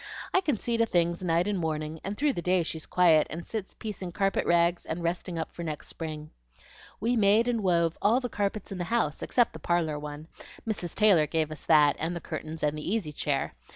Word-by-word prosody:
I 375 - +4
can 295 - 0
see 235 +2 -1
to 230 - +3
things 170 -2 +1
night 170 +1 +1
and 205 -2 0
morning, 155 -1 -3
and 200 +1 -4
through 290 -1 +2
the 175 - -3
day 180 0 +2
she's 160 -1 -4
quiet, 165 -4 +4
and 170 +2 -6
sits 215 -4 -5
piecing 195 -5 -6
carpet 195 +1 0
rags 170 0 +3
and 170 +2 -4
resting 170 0 -2
up 160 - -3
for - - -9
next 155 -3 -5
spring. 155 -2 -6 0.7
We 235 +4 +1
made 215 +2 +4
and 235 -2 0
wove 170 -3 +1
all 220 +5 +4
the 250 - -3
carpets 205 -2 -3
in 190 - -5
the 175 - -2
house, 220 -8 0
except 240 -2 +2
the - - -8
parlor 165 -4 0
one. 150 +1 -8 0.4
Mrs. 190 -6 -3
Taylor 190 -8 +5
gave 155 0 -1
us 155 - -6
that, 150 -2 +5
and 165 +2 -2
the - - -3
curtains, 160 0 -6
and 150 0 +1
the 155 +4 -4
easy 205 -9 -1
chair. 145 - -1
175 Hz, 220 wpm, -28 LUFS, 160-205 Hz, 0.7 s, Taylor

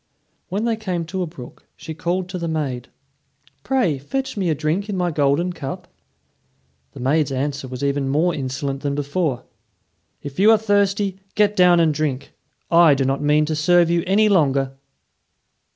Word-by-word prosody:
When 200 +5 -2
they 230 -1 0
came 180 -6 -3
to 185 +3 -4
a 180 - -2
brook, 135 -7 -12
she 160 - -7
called 175 +3 -2
to 180 -1 -5
the 170 - -3
maid: 140 -6 -3 0.7
"Pray 245 - 0
fetch 265 - -4
me 190 -4 -1
a 155 - +1
drink 160 +8 -2
in 200 - -2
my 175 -1 0
golden 150 +4 +1
cup." 140 -5 -7 1.1
The - - -11
maid's 140 +3 +1
answer 140 +1 -3
was 125 +1 -7
even 140 -1 0
more 160 +6 +2
insolent 135 0 -4
than 140 -1 -2
before. 145 -2 -2 0.8
"If 145 +3 -7
you 205 +3 +6
are 225 - +7
thirsty, 200 -2 0 0.2
get 210 -1 +2
down 180 -2 +5
and 160 -2 +3
drink. 145 -3 -3 0.4
I 170 -3 +6
do 135 -1 0
not 135 +1 0
mean 150 +1 +3
to 155 +1 -2
serve 170 +2 +3
you 170 -1 +1
any 210 +3 +4
longer." 140 -8 +2
160 Hz, 175 wpm, -21 LUFS, 140-185 Hz, 1.1 s, are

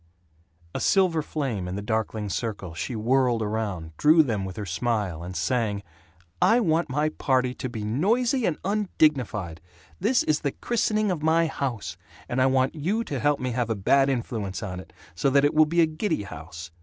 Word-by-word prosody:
A - - -3
silver 185 -5 +3
flame 130 - -3
in 90 - -4
the 100 - -3
darkling 110 -1 -2
circle, 100 -1 -4
she 120 +8 -4
whirled 120 +1 +2
around, 100 -7 -3
drew 160 +2 +6
them 110 -8 -2
with 95 -1 -7
her 105 - -4
smile, 100 -3 -1
and 90 +2 -7
sang, 105 +4 0 0.6
"I 235 - +5
want 165 -6 +1
my 150 +4 +1
party 130 -4 0
to 130 - -5
be 110 -3 -5
noisy 225 - +1
and 160 - -1
undignified! 140 - 0 0.4
This 230 +7 +2
is 150 -1 +1
the 140 - -2
christening 215 -3 0
of 170 -4 -2
my 160 +2 +3
house, 130 -8 -3 0.3
and 125 +1 0
I 130 - +5
want 130 0 +2
you 185 +9 -1
to 140 - -4
help 145 +3 +2
me 130 0 -2
have 120 -1 -1
a 115 - 0
bad 135 +8 +3
influence 115 -6 -3
on 90 -3 -5
it, 95 - -12 0.2
so 90 +12 +1
that 140 +1 +4
it 145 - +2
will 155 0 +5
be 170 +2 +2
a - - +6
giddy 160 - -2
house. 85 0 -9
130 Hz, 195 wpm, -25 LUFS, 105-155 Hz, 0.6 s, drew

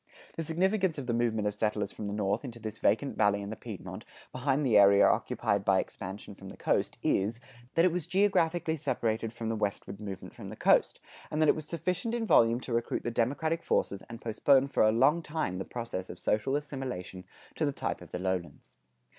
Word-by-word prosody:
The - - -3
significance 185 +2 +1
of 140 - -4
the 120 - -1
movement 115 -3 +1
of 105 - -1
settlers 105 -1 -1
from 105 - -6
the - - -3
North 105 +2 0
into 120 -4 -7
this 110 -1 -7
vacant 125 +7 +1
Valley 105 -1 +3
and 105 +2 -6
Piedmont, 110 -7 -7 0.3
behind 135 +3 0
the 120 -5 +3
area 100 -1 +7
occupied 100 -1 +1
by 100 -2 +3
expansion 100 +2 -6
from 95 -1 -11
the - - -11
coast - - 0
is, 110 +4 +1 0.4
that 165 - +5
it 185 - +4
was 175 -2 -3
geographically 175 -4 +2
separated 115 -5 -1
from 115 -1 -6
the 115 - 0
westward 100 -1 -3
movement 100 -3 -7
from - - -9
the - - -7
coast, - - +3 0.3
and 150 - -2
that 155 -1 +4
it - - +5
was 155 -1 -6
sufficient 180 +7 -2
in 235 -1 -1
volume 115 - +5
to 125 - -5
recruit 115 0 -1
the 120 - -2
democratic 145 +8 0
forces 100 - 0
and 115 0 -8
postpone 135 +5 +3
for - - +1
a 110 - +6
long 135 +9 +4
time 150 - -3
the 95 - -4
process 115 -6 -5
of - - -8
social 110 +6 0
assimilation 130 -11 -5 0.3
to - - -3
the - - +2
type - - -3
of - - -12
the - - -4
lowlands. 90 -1 -4
115 Hz, 210 wpm, -30 LUFS, 105-150 Hz, 0.4 s, area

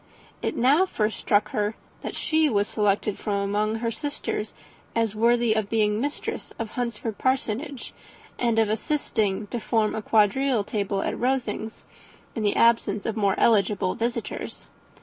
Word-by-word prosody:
It - - -2
now 285 +10 +4
first 215 -9 -1
struck 210 0 +2
her, 210 -2 -1 0.3
that - - -5
she 315 -1 +2
was 205 -4 +1
selected 210 -1 0
from 205 - -1
among 205 +2 0
her 230 0 -1
sisters 285 -6 -4 0.4
as 225 -2 +1
worthy 235 +1 +3
of 215 -2 -1
being 215 -2 +2
the 210 - -1
mistress 290 +2 -4
of 225 -1 -4
Hunsford 235 -3 -3
Parsonage, 260 +1 -1 0.5
and 235 -2 +1
of 225 -1 +4
assisting 215 -4 0
to 235 +4 -4
form 220 -1 +1
a 220 - -2
quadrille 220 +3 +3
table 200 -1 -2
at - - -1
Rosings, 240 -3 -2 0.5
in 225 - -2
the 205 -1 +1
absence 225 -3 +3
of 225 - -1
more 200 -3 +2
eligible 200 -4 +3
visitors. 235 +1 -4
220 Hz, 155 wpm, -25 LUFS, 210-240 Hz, 0.5 s, now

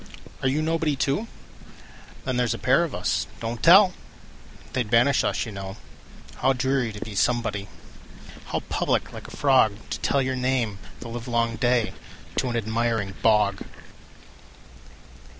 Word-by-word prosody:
Are 135 - +1
you 145 +4 +1
nobody, 160 -2 0
too? 140 +11 0 1.0
Then 130 -2 -1
there 125 0 +2
's - - 0
a - - -6
pair 135 +7 +3
of 165 - -4
us—don't 115 0 -3
tell! 185 +2 +7 0.8
They 130 - +1
'd 110 - -4
banish 125 +4 +4
us, - - 0
you 110 - -7
know. 95 +1 -7 0.6
How 135 - +3
dreary 130 -2 0
to 105 - -7
be 110 - -7
somebody! 105 -2 0 0.8
How - - -2
public, - - -1
like - - -9
a - - -11
frogTo 115 -7 +2
tell 140 -1 +2
your 130 0 -1
name 125 -5 0 0.2
the - - -7
livelong 115 0 -1
dayTo 120 -1 +1 0.6
an 120 - -1
admiring 110 -2 -1
bog! 105 -3 +3
120 Hz, 145 wpm, -25 LUFS, 110-135 Hz, 1.0 s, tell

